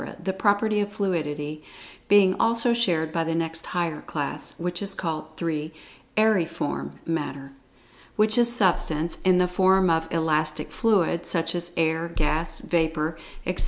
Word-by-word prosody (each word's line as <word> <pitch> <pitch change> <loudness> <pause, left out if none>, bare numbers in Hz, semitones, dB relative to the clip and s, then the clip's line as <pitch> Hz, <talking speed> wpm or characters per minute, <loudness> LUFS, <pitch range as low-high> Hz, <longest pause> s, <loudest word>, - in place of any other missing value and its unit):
the 190 - -2
property 205 +2 +2
of 205 0 -1
fluidity 155 -7 -2 0.4
being 200 -2 +6
also 230 +1 +3
shared 170 -9 +1
by 165 0 0
the 165 0 -1
next 165 0 -3
higher 170 -4 -2
class, 145 -3 -5
which 175 +1 -3
is 195 -1 -3
called: 160 -3 -3
(3) 160 -2 -2 0.5
Aeriform 165 - +1
Matter, 140 -4 -3 0.6
which 215 +1 +3
is 240 0 +4
Substance 170 -7 +1
in 185 -1 +5
the 180 0 +3
form 185 0 +3
of 160 0 0
"elastic 155 -2 0
fluid," 175 -2 +1
such 165 -2 0
as 175 0 -1
air, 160 0 +1
gas, 160 0 -2
vapor, 160 -1 0 0.3
etc. - - -2
170 Hz, 145 wpm, -25 LUFS, 160-190 Hz, 0.6 s, being